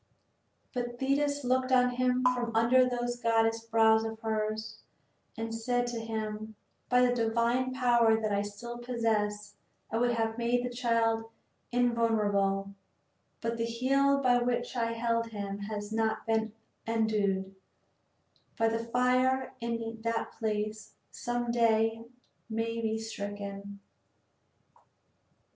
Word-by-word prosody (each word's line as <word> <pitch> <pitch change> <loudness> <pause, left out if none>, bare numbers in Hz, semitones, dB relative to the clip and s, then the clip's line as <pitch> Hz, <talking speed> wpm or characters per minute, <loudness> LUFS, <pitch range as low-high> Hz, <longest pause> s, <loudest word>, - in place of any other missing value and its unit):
But 240 -1 -3
Thetis 285 +1 +1
looked 255 +1 +1
on 250 -1 +5
him 250 0 +1
from 240 -2 -3
under 250 +3 +5
those 245 0 -2
goddess 225 0 +2
brows 225 -1 +4
of 225 0 -5
hers 215 -1 -2 0.6
and 225 0 -4
she 225 - -4
said 245 +1 0
to 235 -1 -3
him: 220 -1 -4 0.3
"By 250 0 +5
the 245 - +2
divine 235 +2 +1
power 240 -3 +3
that 215 -1 -1
I 200 0 +1
still 230 +4 -7
possess 220 -4 -1 0.4
I 225 - 0
would 240 0 +2
have 225 0 -1
made 245 +1 +1
the 245 - -3
child 230 -2 +1 0.4
invulnerable; 210 -5 +1 0.7
but 230 0 -2
the 230 - 0
heel 275 +4 +2
by 245 -2 +4
which 245 +1 -1
I 230 -1 0
held 230 0 0
him 200 -2 -5
has 205 0 -5
not 220 0 0
been 220 -1 0 0.3
endued 205 -4 0 1.0
by 225 -1 +3
the 225 0 -2
fire 255 +2 +1
and 230 0 -2
in 225 0 -6
that 230 0 -2
place 215 -1 -3 0.2
some 240 0 -2
day 225 -2 +3
he 225 +1 -11 0.5
may 230 +1 -1
be 220 -1 0
stricken. 200 -2 -6
230 Hz, 135 wpm, -30 LUFS, 220-245 Hz, 1.0 s, on